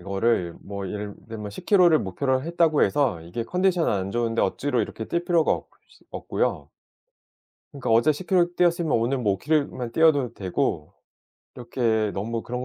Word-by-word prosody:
이거를 95 Hz, -2 st, 0 dB
뭐 100 Hz, -1 st, -6 dB
예를 105 Hz, +1 st, -5 dB
들면 105 Hz, -2 st, -6 dB
10km 180 Hz, -, +3 dB
를 155 Hz, -, +5 dB
목표로 130 Hz, +8 st, -1 dB
했다고 165 Hz, -1 st, +2 dB
해서 135 Hz, -, +1 dB
이게 90 Hz, +8 st, -5 dB
컨디션 180 Hz, +2 st, +1 dB
안 95 Hz, -1 st, -1 dB
좋은데 115 Hz, 0 st, 0 dB
억지로 125 Hz, +6 st, 0 dB
이렇게 110 Hz, -, -6 dB
뛸 170 Hz, 0 st, -2 dB
필요가 170 Hz, -3 st, +3 dB
없이 -, -, -9 dB
없고요. -, -, -2 dB, 1.0 s
그러니까 140 Hz, -6 st, -3 dB
어제 115 Hz, +7 st, +5 dB
10km 175 Hz, +2 st, 0 dB
뛰었으면 170 Hz, -2 st, +2 dB
오늘 120 Hz, +4 st, +1 dB
뭐 105 Hz, -4 st, +1 dB
5km 150 Hz, +8 st, 0 dB
만 120 Hz, -2 st, -5 dB
뛰어도 145 Hz, -4 st, +3 dB
되고 90 Hz, -6 st, -2 dB, 0.7 s
이렇게 115 Hz, -3 st, 0 dB
너무 115 Hz, +3 st, -3 dB
그런 125 Hz, +1 st, -5 dB
120 Hz, 345 characters per minute, -24 LUFS, 105-155 Hz, 1.0 s, 를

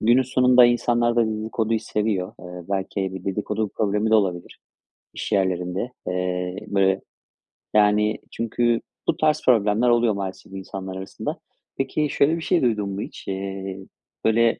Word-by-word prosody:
günün 120 Hz, +4 st, +4 dB
sonunda 125 Hz, -1 st, +5 dB
insanlar 120 Hz, 0 st, +2 dB
da 115 Hz, -, +4 dB
dedikoduyu 110 Hz, +1 st, -1 dB
seviyor. 105 Hz, -4 st, -1 dB
Eee, 90 Hz, -1 st, -9 dB
belki 95 Hz, -1 st, -2 dB
bir 95 Hz, -, -7 dB
dedikodu 105 Hz, +2 st, -2 dB
problemi 105 Hz, +2 st, 0 dB
de 110 Hz, -, +5 dB
olabilir, 90 Hz, -5 st, 0 dB, 0.6 s
iş -, -, -5 dB
yerlerinde. 95 Hz, +3 st, 0 dB
Eee, 90 Hz, 0 st, -2 dB
böyle, 95 Hz, -1 st, +2 dB, 0.7 s
yani, 105 Hz, 0 st, +3 dB
çünkü 115 Hz, 0 st, 0 dB, 0.3 s
bu -, -, +2 dB
tarz 155 Hz, -1 st, +2 dB
problemler 110 Hz, 0 st, +4 dB
oluyor, 120 Hz, -2 st, +3 dB
maalesef 95 Hz, -1 st, -6 dB
insanlar 95 Hz, 0 st, -6 dB
arasında. 95 Hz, 0 st, -5 dB, 0.4 s
Peki, 150 Hz, +2 st, 0 dB
şöyle 145 Hz, +4 st, +3 dB
bir -, -, -6 dB
şey 175 Hz, +1 st, +2 dB
duydun 105 Hz, -5 st, +1 dB
mu 100 Hz, +1 st, -4 dB
hiç? -, -, -9 dB
Eee, 95 Hz, 0 st, -4 dB, 0.5 s
böyle 115 Hz, +1 st, +3 dB
105 Hz, 145 wpm, -23 LUFS, 95-120 Hz, 0.7 s, sonunda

